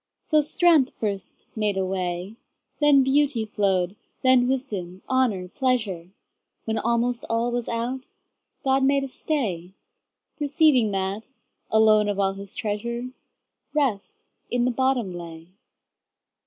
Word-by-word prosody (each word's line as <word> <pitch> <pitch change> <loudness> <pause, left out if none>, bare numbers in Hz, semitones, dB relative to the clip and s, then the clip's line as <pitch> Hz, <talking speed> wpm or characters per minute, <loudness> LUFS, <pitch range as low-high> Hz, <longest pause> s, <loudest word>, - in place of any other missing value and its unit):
So 305 -1 +4
strength 305 -2 +3
first 200 -3 -4
made 210 -3 0
a 190 - +1
way, 185 +1 -3 0.4
Then 290 -2 +6
beauty 270 -3 +2
flow'd, 195 -3 0 0.3
then 255 -1 +5
wisdom, 205 -9 -3
honour, 245 -9 +1
pleasure; 215 -9 -1 0.6
When 220 0 -1
almost 235 +1 0
all 230 +1 0
was 240 -1 -2
out, 245 +4 -3 0.6
God 270 0 +2
made 275 +1 +3
a - - -3
stay, 200 - -3 0.7
Perceiving 290 -5 +3
that, 195 +2 -3 0.4
alone 215 -1 +4
of 205 - -1
all 195 -1 +2
His 195 0 -10
treasure, 235 +4 -3 0.6
Rest 270 - 0 0.3
in 245 0 +1
the 250 - +2
bottom 250 -6 0
lay. 165 -1 -9
230 Hz, 125 wpm, -24 LUFS, 195-265 Hz, 0.7 s, Then